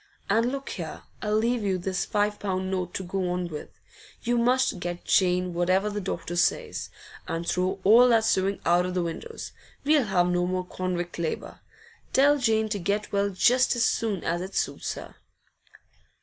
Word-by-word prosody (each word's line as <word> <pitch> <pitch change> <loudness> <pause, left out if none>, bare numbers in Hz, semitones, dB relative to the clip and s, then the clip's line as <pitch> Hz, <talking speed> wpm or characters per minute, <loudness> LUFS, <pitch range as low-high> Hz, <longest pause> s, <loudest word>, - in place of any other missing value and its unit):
And 230 +2 +3
look 275 0 -5
here, - - -6 0.2
I'll 210 0 0
leave 235 +2 +1
you 195 -2 0
this 185 +1 -2
five 210 -1 0
pound 190 -1 -2
note 180 -2 -3
to 190 - -2
go 185 0 -2
on 180 0 -2
with. 150 -2 -9 0.4
You 240 0 +1
must 250 -3 +2
get 175 0 -5
Jane 180 -1 +2
whatever 185 +4 +1
the 205 0 -3
doctor 175 -2 -4
says. 175 - 0 0.4
And 165 +1 -3
throw 185 +1 0
all 235 +5 +7
that 230 -2 +4
sewing 195 0 +1
out 175 +1 +3
of 180 - -4
the 180 - +1
windows; 450 - -6 0.3
we'll 295 -3 +4
have 180 -4 +2
no 180 0 +1
more 185 0 -1
convict 180 -1 -4
labour. 165 -2 -4 0.5
Tell 285 +2 +5
Jane 220 -3 +2
to 210 -1 -2
get 200 +3 -1
well 200 0 +1
just 245 +7 +3
as 240 - +2
soon 215 -6 0
as 170 +1 -1
it 190 +2 -7
suits - - -2
her. - - -10
190 Hz, 180 wpm, -26 LUFS, 180-225 Hz, 0.5 s, all